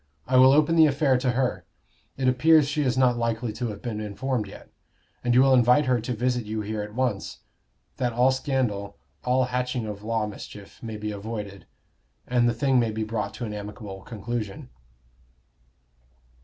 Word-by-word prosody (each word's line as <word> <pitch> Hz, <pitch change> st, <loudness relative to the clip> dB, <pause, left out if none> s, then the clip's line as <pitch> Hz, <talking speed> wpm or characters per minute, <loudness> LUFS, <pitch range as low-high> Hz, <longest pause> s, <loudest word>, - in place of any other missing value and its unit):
I 130 Hz, -, 0 dB
will 130 Hz, +1 st, +8 dB
open 155 Hz, +3 st, +4 dB
the 160 Hz, -1 st, +8 dB
affair 140 Hz, -1 st, +2 dB
to 125 Hz, -1 st, 0 dB
her; 130 Hz, 0 st, -1 dB, 0.5 s
it 130 Hz, -1 st, 0 dB
appears 150 Hz, +4 st, +5 dB
she 150 Hz, +1 st, -1 dB
is 130 Hz, -3 st, 0 dB
not 125 Hz, -2 st, +3 dB
likely 115 Hz, -1 st, -1 dB
to 120 Hz, +3 st, -3 dB
have 105 Hz, -2 st, -7 dB
been 110 Hz, -4 st, -3 dB
informed 110 Hz, +2 st, -2 dB
yet; -, -, -13 dB, 0.5 s
and 120 Hz, 0 st, +2 dB
you 130 Hz, -, +7 dB
will 135 Hz, -1 st, +5 dB
invite 125 Hz, +4 st, +5 dB
her 125 Hz, -3 st, +1 dB
to 125 Hz, +3 st, -3 dB
visit 125 Hz, +1 st, 0 dB
you 110 Hz, +1 st, -3 dB
here 105 Hz, 0 st, -3 dB
at 105 Hz, +1 st, -8 dB
once, 120 Hz, -6 st, -2 dB, 0.6 s
that 125 Hz, -2 st, 0 dB
all 125 Hz, +3 st, +3 dB
scandal, 120 Hz, -7 st, -2 dB, 0.3 s
all 125 Hz, +1 st, +2 dB
hatching 125 Hz, -1 st, -2 dB
of 105 Hz, -1 st, -6 dB
law 110 Hz, 0 st, -1 dB
mischief, 100 Hz, -1 st, -10 dB
may 110 Hz, -2 st, -6 dB
be 105 Hz, 0 st, -4 dB
avoided, 105 Hz, -1 st, -6 dB, 0.6 s
and 120 Hz, -1 st, +2 dB
the -, -, 0 dB
thing 135 Hz, 0 st, +2 dB
may 115 Hz, -2 st, +1 dB
be 110 Hz, 0 st, -3 dB
brought 105 Hz, -2 st, -3 dB
to 120 Hz, -, -5 dB
an 105 Hz, -, -5 dB
amicable 105 Hz, -1 st, -7 dB
conclusion." 110 Hz, -, -5 dB
120 Hz, 185 wpm, -25 LUFS, 105-130 Hz, 0.6 s, will